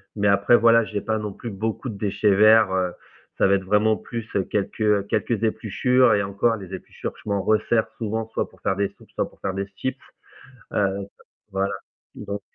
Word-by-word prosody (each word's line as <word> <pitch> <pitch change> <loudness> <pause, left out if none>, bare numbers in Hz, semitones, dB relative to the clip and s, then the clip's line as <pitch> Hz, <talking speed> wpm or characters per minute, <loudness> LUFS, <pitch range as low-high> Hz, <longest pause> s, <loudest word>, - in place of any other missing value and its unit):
mais 100 -1 +2
après 100 +4 +5
voilà, 115 -1 +5
j'ai 105 -2 -4
pas 110 +2 -1
non 105 -2 -4
plus 120 - -7
beaucoup 110 +5 -3
de 105 - -6
déchets 100 0 +1
verts, 110 0 +6
heu, 90 -1 0 0.4
ça - - +4
va 100 - +4
être 95 -1 -3
vraiment 105 +2 +3
plus, 115 -2 -6
heu, 95 - 0
quelques 105 0 0
quelques 115 +1 -1
épluchures 125 +4 +2
et 100 -1 +2
encore 100 +4 +1
les 95 -3 -9
épluchures, 95 - -6
je - - -17
m'en 100 -1 +1
resserre 110 +1 +2
souvent, 110 0 -3
soit - - -2
pour - - -23
faire 95 - 0
des 100 0 +1
soupes, - - -19
soit - - -2
pour - - -25
faire 95 - -2
des 100 0 -3
chips, 130 +6 -3 0.8
heu 100 -1 0 0.4
voilà, 95 +1 -1 0.4
exact 100 0 -5
105 Hz, 200 wpm, -23 LUFS, 100-110 Hz, 0.8 s, verts